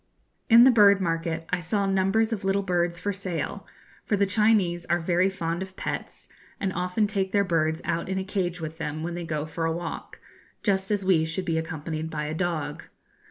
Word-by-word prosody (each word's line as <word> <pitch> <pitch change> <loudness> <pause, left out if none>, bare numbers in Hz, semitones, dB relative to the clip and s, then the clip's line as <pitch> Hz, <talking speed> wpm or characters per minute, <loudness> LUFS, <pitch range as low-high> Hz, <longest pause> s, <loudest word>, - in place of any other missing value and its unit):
In 230 +1 +9
the 260 - +8
bird 205 -4 +6
market 165 -2 -2
I 185 -1 0
saw 200 +4 0
numbers 195 +4 +2
of 205 - -4
little 195 +1 +1
birds 175 -2 0
for 205 +2 -2
sale, 185 0 -4 0.4
for 210 - 0
the 200 - +3
Chinese 195 -4 +2
are 170 - +2
very 175 +2 +2
fond 170 -2 -3
of 190 0 -7
pets, - - -5 0.3
and 190 -1 -1
often 180 +5 0
take 195 -2 -1
their 200 - +4
birds 160 -3 0
out 170 +2 -2
in 190 - -1
a 190 - -1
cage 185 -3 -2
with 160 0 -6
them 155 0 -3
when 170 +1 -3
they 175 0 -5
go 155 -2 -2
for 160 +1 -5
a 165 - +1
walk, 165 0 -6 0.4
just 190 -2 +1
as 205 -2 0
we 180 -4 +4
should 165 +4 -3
be 165 -2 0
accompanied 160 -1 -4
by 150 -1 -3
a 150 - -3
dog. 160 -4 -2
180 Hz, 205 wpm, -26 LUFS, 165-195 Hz, 0.4 s, In